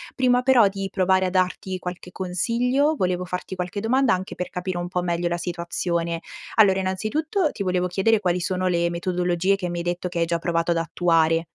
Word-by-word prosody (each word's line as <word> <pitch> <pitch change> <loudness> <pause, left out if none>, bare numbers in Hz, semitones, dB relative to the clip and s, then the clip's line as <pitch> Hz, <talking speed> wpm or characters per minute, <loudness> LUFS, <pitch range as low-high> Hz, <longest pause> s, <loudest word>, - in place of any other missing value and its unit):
Prima 250 -1 +3
però 245 -6 +5
di 195 0 -4
provare 190 0 +2
a - - 0
darti 185 0 -1
qualche 180 0 -7
consiglio, 245 - 0
volevo 180 0 0
farti 180 +1 -5
qualche 180 +2 -4
domanda 255 +1 +3
anche 185 +1 -3
per 180 - -4
capire 180 -1 -4
un 175 0 -3
po' 180 0 -2
meglio 175 0 -1
la 175 0 -1
situazione. 170 -1 -2 0.3
Allora, 195 -3 +5
innanzitutto 290 - -1
ti 200 - -4
volevo 180 -1 0
chiedere: 205 +4 +2
quali 180 -1 +1
sono 185 +1 -1
le 170 -1 +1
metodologie 180 +2 0
che 180 -2 -3
mi 175 0 -3
hai - - -3
detto 175 +1 -2
che 175 -1 -4
hai 165 - +3
già 170 0 0
provato 170 0 0
ad 170 - +1
attuare? 165 -1 +2
180 Hz, 200 wpm, -23 LUFS, 175-195 Hz, 0.3 s, però